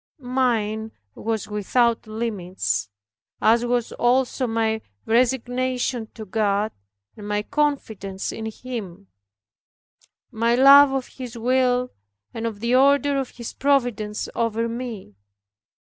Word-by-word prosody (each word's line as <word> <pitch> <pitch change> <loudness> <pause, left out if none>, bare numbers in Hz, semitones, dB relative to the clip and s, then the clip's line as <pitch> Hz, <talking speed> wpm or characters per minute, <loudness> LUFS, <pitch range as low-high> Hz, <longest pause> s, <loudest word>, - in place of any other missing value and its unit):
Mine 220 -4 0 0.2
was 220 - -3
without 225 +3 +1
limits, 185 - -2 0.5
as 230 +2 +4
was 240 -1 0
also 255 +1 +1
my 225 -1 0 0.2
resignation 250 0 0
to 220 - -7
God, 210 +1 0 0.4
and 205 -1 -9
my 210 0 -1
confidence 220 -10 -2
in 220 - -5
Him 205 -5 -7 1.2
my 230 +2 +2
love 275 +2 +8
of 270 -2 -1
His 250 -2 -9
will, 250 +1 +1 0.4
and 230 0 -3
of 215 -2 -6
the 235 +1 0
order 280 +1 +4
of 265 - -3
His 235 -2 -6
providence 245 -7 0
over 230 0 0
me. 230 - -6
230 Hz, 115 wpm, -23 LUFS, 215-255 Hz, 1.2 s, love